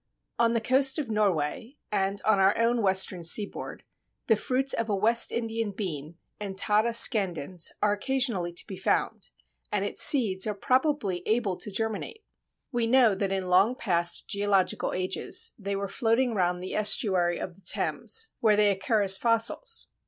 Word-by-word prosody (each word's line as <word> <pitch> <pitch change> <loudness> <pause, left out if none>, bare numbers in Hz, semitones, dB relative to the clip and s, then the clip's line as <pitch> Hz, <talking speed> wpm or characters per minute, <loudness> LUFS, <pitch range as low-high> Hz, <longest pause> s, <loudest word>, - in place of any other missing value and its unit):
On 230 0 +2
the 230 - 0
coast 265 +3 +2
of 280 -7 -4
Norway, 210 - -2
and 195 0 -1
on 215 -2 +3
our 195 +1 +3
own 230 +1 +1
western 190 -3 0
seaboard, 200 +5 -2 0.4
the 225 - +3
fruits 260 +5 -1
of 230 -1 -3
a 205 - 0
West 225 +4 +3
Indian 225 -2 -3
bean 165 -6 -6 0.2
(Entada 210 +3 0
scandens) 185 - +2
are 210 - +3
occasionally 220 -5 -1
to 175 - -3
be 190 - -9
found, 190 - -2 0.4
and 200 -1 -1
its - - 0
seeds 215 -9 +4
are 210 - -3
probably 255 - -1
able 215 -4 0
to 210 - -5
germinate. 220 - -4 0.5
We 240 -3 -1
know 240 -3 +4
that 195 0 -3
in 190 -1 -2
long 190 +7 +2
past 175 -7 0
geological 200 -2 0
ages 185 +1 0
they 200 -1 -4
were 200 0 -4
floating 230 +3 0
round 180 -3 -1
the 185 - -6
estuary 190 -5 +1
of 180 - -6
the 195 - -23
Thames, 445 - +1
where 215 -2 +3
they 205 -1 +3
occur 205 +2 -1
as 190 -1 +5
fossils. 235 - 0
210 Hz, 165 wpm, -26 LUFS, 190-230 Hz, 0.5 s, as